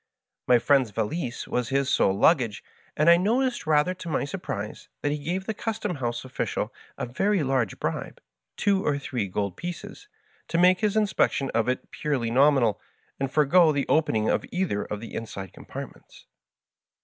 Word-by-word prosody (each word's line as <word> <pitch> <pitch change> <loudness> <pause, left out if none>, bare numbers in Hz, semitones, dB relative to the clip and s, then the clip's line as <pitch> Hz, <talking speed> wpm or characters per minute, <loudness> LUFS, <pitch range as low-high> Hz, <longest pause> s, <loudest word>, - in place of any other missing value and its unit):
My 125 - +6
friend's 130 -1 +3
valise 120 - -3
was 125 -2 -1
his 135 0 +1
sole 100 -7 +2
luggage, 120 -7 +3 0.3
and 150 - +2
I 170 0 +8
noticed^ 240 +1 0
rather 155 +3 +3
to 175 -2 -8
my 145 - 0
surprise, 110 - -6
that 145 - +1
he 150 - -2
gave 175 +6 -3
the 220 - -2
custom 210 -5 -3
house 120 -1 -3
official 130 - -3 0.2
a - - -2
very 190 - +1
large 130 -6 0
bribe - - -3 0.2
— - - -59
two 195 -1 +2
or 145 -1 +1
three 125 -6 -3
gold 100 0 -3
pieces 205 - -7 0.2
— - - -35
to 165 - -1
make 180 +1 +5
his 215 -1 +1
inspection 190 -9 +1
of 115 +1 +1
it 125 - -3
purely 130 -6 -1
nominal, 130 -5 +4 0.4
and 135 -1 -2
forego 155 +3 +5
the 140 -2 0
opening 110 -9 +2
of - - +1
either 175 - -1
of 105 0 -5
the 115 - -9
inside 100 -5 -6
compartments. - - -10
140 Hz, 175 wpm, -26 LUFS, 115-180 Hz, 0.4 s, I